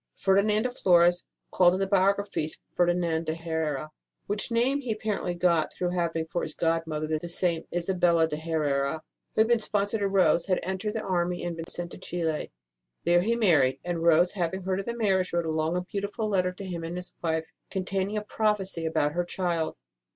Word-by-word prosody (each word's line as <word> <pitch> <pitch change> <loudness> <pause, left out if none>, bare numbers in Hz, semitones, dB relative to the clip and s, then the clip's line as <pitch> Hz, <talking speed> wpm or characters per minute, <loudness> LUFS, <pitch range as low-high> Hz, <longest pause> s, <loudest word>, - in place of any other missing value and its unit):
Ferdinand 205 +2 +3
de 250 - -1
Flores 175 -6 +4 0.3
called 180 0 +5
in - - -2
the 195 - +1
biographies 195 -4 +1 0.2
Ferdinand 175 -2 +1
de 160 - 0
Herera, 160 -3 -3 0.3
which 205 +3 -2
name 250 +5 +2
he 250 -4 -3
apparently 210 -4 -2
got 170 -3 +2
through 180 -1 -2
having 170 -2 -1
for 175 +2 -3
his 155 - -5
godmother 165 -2 0
the 175 - -6
same 170 -1 0
Isabel 175 -2 +2
de 160 - -3
Herera 150 -2 -1 0.3
who - - +4
had 220 - +4
been 235 -1 +3
sponsor 205 0 -1
to 200 - +1
Rose 190 -3 +3
had 185 -2 +2
entered 190 +4 -3
the 220 - -2
army 175 -1 -1
and 175 -1 -3
been 165 0 -6
sent 175 0 -4
to - - -10
Chili. 165 -4 -3 0.5
There 175 +1 +4
he 230 +5 +1
married; 160 - +3
and 175 -1 -2
Rose, 170 +1 +5
having 190 -1 -2
heard 190 +1 -1
of 195 - -5
the 235 0 -3
marriage, 190 -5 +1
wrote 170 -1 +1
a 160 - -1
long 160 +2 0
and 180 0 -4
beautiful 205 +3 -3
letter 185 -3 +1
to 190 +2 -9
him 175 -3 -5
and 170 +2 -4
his 180 0 -7
wife, 160 -1 0 0.2
containing 195 +2 -2
a 210 - -2
prophecy 205 -6 -1
about 150 -2 +1
her 175 +3 0
child. 175 -2 -2
175 Hz, 200 wpm, -27 LUFS, 165-195 Hz, 0.5 s, called